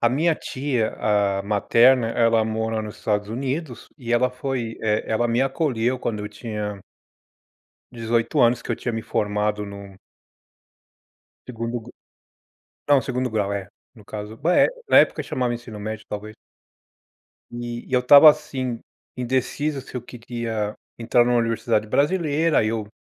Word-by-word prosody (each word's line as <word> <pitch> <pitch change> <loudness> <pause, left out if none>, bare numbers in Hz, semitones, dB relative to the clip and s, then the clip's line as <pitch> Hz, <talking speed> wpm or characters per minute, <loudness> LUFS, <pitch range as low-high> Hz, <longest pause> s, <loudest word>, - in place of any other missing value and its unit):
A 120 - +4
minha 160 +7 +2
tia, 130 -6 -2
ah, 100 -2 +1
materna, 115 +4 +4
ela 115 -1 +3
mora 110 0 -2
nos 105 -1 -8
Estados 105 -1 -1
Unidos 130 +3 -4
e 120 -4 -4
ela 125 +1 +3
foi 125 -3 -4
eh, 105 -1 +1
ela 110 +2 +1
me 115 +2 +1
acolheu 130 -3 0
quando 110 -3 -3
eu 105 - -5
tinha 105 -1 -5 1.1
18 115 -1 -1
anos, 120 0 +4
que - - -12
eu - - 0
tinha 120 - -3
me 115 - -2
formado 105 0 -1
num 100 -1 -10 1.5
segundo 115 0 -4
gru 120 +2 -13 0.9
não, 145 -2 +5
segundo 130 -1 -2
grau, 105 -3 -1
é, 100 -1 -4 0.3
no 110 - -15
caso. 105 +1 -7
Ba 170 +8 +1
eh, - - +6 0.2
na - - +7
época - - +4
chamava 125 -2 -1
ensino 115 -3 -8
médio, 110 +1 -6
talvez. 105 +1 -6 1.2
E 120 0 -6
e - - -7
eu 125 - +5
estava, 140 +5 +9
assim, 130 -6 -2 0.4
indeciso 130 +3 -1
se 130 - -13
eu 125 - -3
queria 115 -3 -4 0.2
entrar 120 +1 +3
numa 120 0 +2
universidade 115 -1 0
brasileira. 155 - +2
Aí 110 - +1
eu 110 -1 -2
115 Hz, 155 wpm, -23 LUFS, 110-130 Hz, 1.5 s, estava